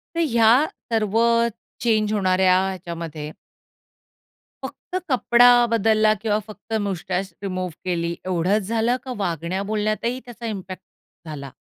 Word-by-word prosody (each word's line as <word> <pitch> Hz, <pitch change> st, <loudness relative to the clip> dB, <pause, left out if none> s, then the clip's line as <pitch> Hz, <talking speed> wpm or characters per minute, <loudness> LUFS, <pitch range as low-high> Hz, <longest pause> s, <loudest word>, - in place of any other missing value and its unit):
तर -, -, -1 dB
या 230 Hz, -1 st, +5 dB, 0.4 s
सर्व 220 Hz, -1 st, +1 dB, 0.6 s
चेंज 215 Hz, -2 st, +1 dB
होणाऱ्या 185 Hz, -2 st, +3 dB, 0.2 s
याच्यामध्ये 165 Hz, -4 st, -6 dB, 1.3 s
फक्त 365 Hz, -, -9 dB, 0.2 s
कपडा 245 Hz, -1 st, +5 dB, 0.2 s
बदलला 215 Hz, -1 st, +3 dB
किंवा 215 Hz, -1 st, +1 dB
फक्त 215 Hz, +1 st, -10 dB
मुस्टच 185 Hz, 0 st, -3 dB
रिमूव्ह 185 Hz, -2 st, -3 dB
केली 170 Hz, -2 st, -1 dB
एवढंच 185 Hz, +3 st, +1 dB
झालं, 230 Hz, +2 st, +1 dB
का 260 Hz, -, -5 dB
वागण्या 170 Hz, +2 st, -2 dB
बोलण्यातही 215 Hz, +3 st, -1 dB
त्याचा 240 Hz, -1 st, -9 dB
इम्पॅक्ट 190 Hz, -4 st, -6 dB, 0.4 s
झाला? 140 Hz, -3 st, -7 dB
205 Hz, 115 wpm, -22 LUFS, 180-225 Hz, 1.3 s, या